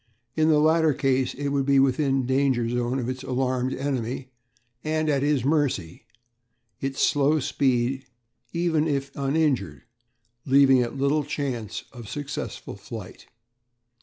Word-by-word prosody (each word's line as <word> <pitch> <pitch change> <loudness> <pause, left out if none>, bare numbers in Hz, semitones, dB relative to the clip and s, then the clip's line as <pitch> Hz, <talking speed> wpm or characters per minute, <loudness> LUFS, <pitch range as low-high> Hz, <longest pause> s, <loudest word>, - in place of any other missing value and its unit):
In 155 0 +3
the 155 - +5
latter 160 -1 +3
case 130 -2 +1
it 140 +1 -2
would 140 -1 0
be 140 -1 +4
within 135 0 +2
the - - -4
danger 130 -4 +2
zone 120 +2 -1
of 125 -3 -2
its 130 0 -4
alarmed 130 0 -1
enemy 130 -1 -3 0.5
and 155 0 0
at 140 -2 +1
his 145 -3 +1
mercy, 135 - -1 0.7
its 135 0 -3
slow 145 +1 +2
speed 130 -1 0 0.4
(even 165 -2 +1
if 140 -2 -1
uninjured) 135 - 0 0.6
leaving 135 -1 +5
it 120 +1 -1
little 140 +2 +1
chance 135 -7 -4
of 120 -4 -10
successful 145 +1 -5
flight. - - -10
135 Hz, 135 wpm, -25 LUFS, 130-145 Hz, 0.7 s, the